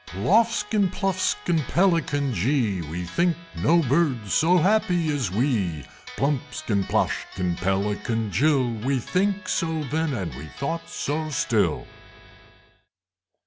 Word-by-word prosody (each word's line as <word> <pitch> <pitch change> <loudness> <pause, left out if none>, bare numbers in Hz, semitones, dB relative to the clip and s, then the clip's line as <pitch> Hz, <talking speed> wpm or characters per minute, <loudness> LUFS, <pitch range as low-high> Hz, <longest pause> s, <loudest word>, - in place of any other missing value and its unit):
Ploffskin, 210 - +2
Pluffskin, 185 -3 0
Pelican 165 -6 +1
jee! 110 - 0
We 85 +3 -5
think 170 - 0 0.2
no 170 +2 +3
Birds 130 - +1
so 175 +4 +4
happy 180 -3 +2
as 130 -9 -1
we! 100 - -1 0.3
Plumpskin, 135 -6 -1
Ploshkin, 90 -2 -1
Pelican 105 +3 -1
jill! 135 - +2 0.2
We 135 +1 +1
think 190 - -1
so 160 -4 -1
then, 160 0 0
and 90 - -4
we 70 +5 -8
thought 165 +5 -3
so 155 +2 -3
still! 145 - 0
145 Hz, 110 wpm, -24 LUFS, 105-170 Hz, 0.3 s, so